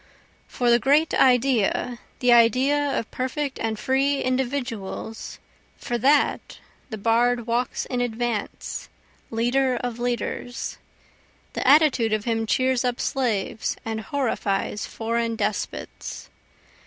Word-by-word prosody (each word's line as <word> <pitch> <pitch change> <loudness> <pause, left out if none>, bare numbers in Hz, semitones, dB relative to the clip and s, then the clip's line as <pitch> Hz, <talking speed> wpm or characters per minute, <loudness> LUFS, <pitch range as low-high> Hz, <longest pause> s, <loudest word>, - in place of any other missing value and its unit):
For 245 -1 +1
the 235 - +5
great 290 +6 +3
Idea, 250 -2 +2 0.2
the 245 -1 +5
idea 265 +5 +3
of 225 - -4
perfect 265 +2 -3
and 220 -1 -2
free 275 +4 +1
individuals, 245 -5 -3 0.4
For 240 0 -3
that, 285 +5 +2 0.3
the 220 - -5
bard 235 +2 +2
walks 240 +2 -1
in 250 -1 -2
advance, 235 -2 -3 0.4
leader 250 +3 +1
of 240 -1 -4
leaders, 245 0 -3 0.7
The - - -2
attitude 270 -6 +5
of 215 -1 -1
him 225 -1 0
cheers 260 +1 +2
up 245 -1 -1
slaves 225 -5 -1
and 220 -1 -3
horrifies 215 -5 -1
foreign 230 0 -2
despots. 210 -1 -4
245 Hz, 115 wpm, -24 LUFS, 225-260 Hz, 0.7 s, the